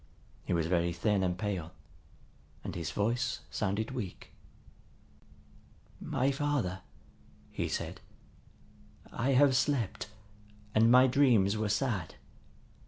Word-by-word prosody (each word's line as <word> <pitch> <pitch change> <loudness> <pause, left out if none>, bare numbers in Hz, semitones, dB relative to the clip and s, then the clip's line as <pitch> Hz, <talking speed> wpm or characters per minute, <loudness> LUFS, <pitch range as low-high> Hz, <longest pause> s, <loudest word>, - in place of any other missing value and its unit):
He - - -4
was 85 -2 +1
very 85 0 +1
thin 100 +3 +1
and 90 -1 0
pale, 95 -5 -3 0.9
and - - -5
his 85 -3 -4
voice 120 +4 -1
sounded 105 +3 -1
weak. 105 -8 -6 1.7
"My 135 +2 0
father," 135 -10 -1 0.7
he - - -2
said, - - -4 1.1
"I 130 +4 0
have 135 0 +5
slept, 130 -8 0 0.7
and 110 +1 +5
my 125 +2 +7
dreams 120 -7 +4
were 110 -1 -1
sad. 100 - -1
110 Hz, 105 wpm, -31 LUFS, 95-130 Hz, 1.7 s, my